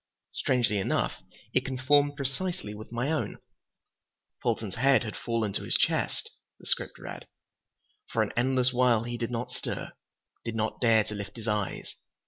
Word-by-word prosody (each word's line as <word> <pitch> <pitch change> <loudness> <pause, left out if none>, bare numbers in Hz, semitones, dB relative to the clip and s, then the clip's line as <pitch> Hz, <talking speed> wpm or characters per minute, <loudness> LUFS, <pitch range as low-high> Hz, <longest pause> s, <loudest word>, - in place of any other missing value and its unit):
Strangely 120 -6 +2
enough, 95 - 0 0.3
it - - +4
conformed 145 +3 +3
precisely 140 - -2
with 110 +2 -9
my 120 +5 0
own. 160 - -1 1.0
"Fulton's 110 -4 0
head 135 +2 +4
had 105 - -5
fallen 115 -4 -1
to - - -1
his - - 0
chest," - - +1 0.3
the - - -16
script - - -1
read. - - -8 0.8
"For 110 - +2
an 105 - -4
endless 130 0 +3
while 120 -3 +4
he 120 0 -3
did 115 -1 -2
not 120 0 -3
stir, - - -4 0.5
did 115 -1 -3
not 110 0 -1
dare 115 -3 +6
to 105 - -6
lift 100 -1 -6
his 115 -1 -6
eyes. 105 -2 -1
120 Hz, 160 wpm, -29 LUFS, 110-130 Hz, 1.0 s, dare